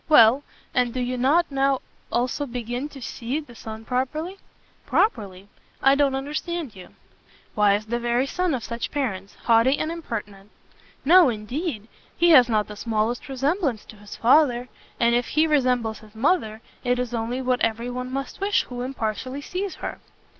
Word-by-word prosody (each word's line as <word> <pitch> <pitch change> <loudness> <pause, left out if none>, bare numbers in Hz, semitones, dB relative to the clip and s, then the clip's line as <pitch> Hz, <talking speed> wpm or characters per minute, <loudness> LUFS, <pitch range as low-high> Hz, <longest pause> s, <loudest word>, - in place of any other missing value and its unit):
"Well, 255 -2 +7 0.3
and 250 -1 +1
do - - -1
you 250 0 -1
not 285 +7 +2
now 275 0 +2 0.3
begin - - -35
also 255 +4 0
to 245 +4 -5
see 245 +6 -3
the 290 -6 -12
son 220 -1 -9
properly?" 305 - -2 0.5
"Properly? 200 - 0 0.3
I 270 - +5
don't 280 -1 +2
understand 295 - -4
you." 185 -1 -13 0.6
"Why 205 -1 +4
as 210 +1 -3
the 235 +2 -2
very 240 +2 +1
son 360 +1 0
of 240 - -5
such 235 +3 -4
parents, 205 -9 -3
haughty 235 +4 +4
and 310 - -2
impertinent." 210 -11 -6 0.6
"No, 345 0 +7
indeed; 230 - -4 0.3
he 345 0 +5
has 255 -6 +8
not 215 -2 +1
the 210 - -8
smallest 225 +3 -1
resemblance 270 - -1
[to] - - -13
his 205 0 -10
father, 250 -1 +3 0.3
and 235 0 +4
if 240 0 +1
he 310 +2 +3
resembles 250 -7 +1
his 215 0 -17
mother, 225 -4 +1 0.2
it 245 -1 +1
is 250 -1 -3
only 235 +2 -2
what 255 -1 0
every 230 +2 0
one 250 +1 -5
must 275 +7 -5
wish 400 +1 +2
who 245 -1 -7
impartially 255 +1 -3
sees 370 +5 -4
her." - - -5
250 Hz, 170 wpm, -24 LUFS, 225-285 Hz, 0.6 s, has